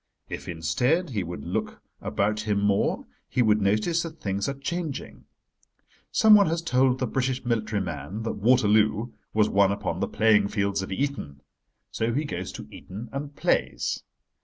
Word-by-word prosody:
If, - - -6
instead, 125 - 0
he 105 -5 -1
would 85 -5 -6
look - - -3 0.2
about 105 +2 0
him 105 -2 0
more 100 0 +1 0.2
he 125 - +2
would 105 -1 +3
notice 105 - +2
that 165 -2 -7
things 100 -3 -1
are 140 - -3
changing. 155 +1 -5 0.9
Someone 210 -3 +7
has 165 +1 -1
told 130 -4 +3
the 130 - -1
British 130 +1 -1
military 110 -4 0
man 90 +11 -5
that 115 - -3
Waterloo 110 0 +3 0.2
was 105 -1 +3
won 100 -1 +4
upon 100 - -2
the - - 0
playing 110 -2 +3
fields 100 -1 0
of 95 - -6
Eton. 95 - -3 0.5
So 115 +1 -1
he 150 +3 0
goes 90 -9 -4
to - - -8
Eton 105 +6 -9
and 140 +1 -5
plays. - - 0
110 Hz, 160 wpm, -26 LUFS, 100-135 Hz, 0.9 s, Someone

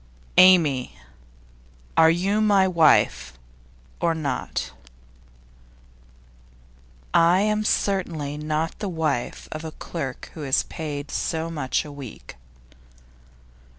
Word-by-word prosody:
'Amy, 160 - +5 1.0
are 160 - +6
you 195 +6 +1
my 200 -3 +4
wife, 170 -4 +3 0.7
or 170 -1 +1
not?' 140 - -3 2.4
'I 175 +3 +5
am 210 +1 +1
certainly 170 -9 -1
not 155 +2 -3
the 205 - -3
wife 155 -7 -2
of 155 +1 -6
a 160 - -5
clerk 135 -7 -6
who 155 - -8
is 135 -2 +2
paid 150 -3 -6
so 165 0 -2
much 145 -2 -2
a 150 - -9
week. 140 -5 -10
160 Hz, 100 wpm, -24 LUFS, 145-180 Hz, 2.4 s, are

